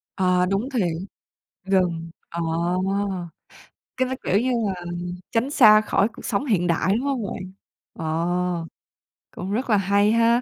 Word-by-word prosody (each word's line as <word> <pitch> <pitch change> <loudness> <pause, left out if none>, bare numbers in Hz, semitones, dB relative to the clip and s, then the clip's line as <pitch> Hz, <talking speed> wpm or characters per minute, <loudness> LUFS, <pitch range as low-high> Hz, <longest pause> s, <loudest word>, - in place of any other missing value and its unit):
Ờ, 180 -1 +2
đúng 195 +7 -1
thiệt, 235 -10 +1 0.8
rừng 180 -4 0 0.2
ờ. 170 0 -4 1.6
Cái 255 - +1
đó, 260 - -2
kiểu 195 - +2
như 255 +3 0 0.2
là, 195 - -1 0.6
tránh 235 +3 +1
xa 215 -7 +7
khỏi 205 -1 +2
cuộc 225 - -12
sống 225 +4 -1
hiện 190 -9 +1
đại, 170 +2 +2
đúng 235 - 0
hông 270 -5 -1
bạn? 185 -1 -6 0.4
Ờ, 170 +2 -1 0.7
cũng 185 +2 -5
rất 245 +4 -2
là 210 - +5
hay 200 +2 +3
ha! 230 +1 +4
195 Hz, 150 wpm, -23 LUFS, 180-230 Hz, 1.6 s, xa